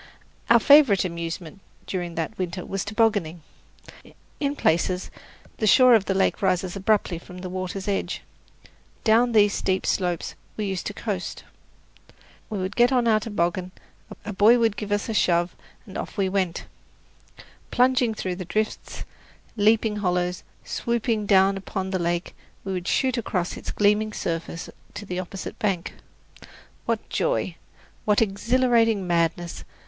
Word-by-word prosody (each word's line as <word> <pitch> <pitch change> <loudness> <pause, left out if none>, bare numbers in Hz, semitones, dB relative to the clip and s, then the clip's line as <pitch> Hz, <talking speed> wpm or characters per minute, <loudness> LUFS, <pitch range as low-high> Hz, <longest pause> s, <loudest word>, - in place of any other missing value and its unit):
Our 235 - +7
favourite 270 -8 +6
amusement 170 0 -5 0.3
during 175 -3 -4
that 165 +6 -3
winter 180 0 -4
was 195 0 -3
tobogganing. 205 -7 0 1.0
In 285 -1 -1
places 180 - 0 0.5
the 215 - 0
shore 255 +3 +7
of 215 -4 +4
the 195 - -1
lake 195 - +1
rises 185 -1 0
abruptly 195 -3 +1
from 180 +1 -12
the 180 0 -6
water's 185 +1 -4
edge. 200 -1 -2 0.8
Down 235 +2 +4
these 205 -2 +5
steep 190 0 -1
slopes 180 -3 -1 0.2
we 215 - -1
used 190 -2 -3
to 210 - -5
coast. 195 -5 -4 1.1
We 215 - -3
would 185 0 -3
get 240 +1 +4
on 245 -2 +2
our 215 -1 +4
toboggan, 185 -4 -2 0.5
a 210 - -4
boy 210 +5 +6
would 225 -3 +2
give 205 0 -5
us 205 0 0
a 225 - -2
shove, 175 -3 +2 0.3
and - - -12
off - - -7
we 195 -1 +2
went! 185 -3 -1 1.0
Plunging 250 -2 +2
through 185 -3 -3
drifts, 215 +4 -3 0.5
leaping 215 0 +3
hollows, 180 -2 -1 0.2
swooping 230 -3 -1
down 195 0 +4
upon 190 0 -4
the 185 - 0
lake, 175 +1 -1 0.3
we 195 - -3
would 180 -1 -4
shoot 260 -2 +1
across 180 -5 -2
its - - -7
gleaming 210 +1 +2
surface 165 0 -4 0.3
to 205 - -6
the 180 -2 -4
opposite 185 +1 -7
bank. 190 -5 -1 0.9
What - - -1
joy! - - 0 0.5
What 210 -1 +3
exhilarating 225 0 +2
madness! 170 0 -1
195 Hz, 145 wpm, -24 LUFS, 180-220 Hz, 1.1 s, Our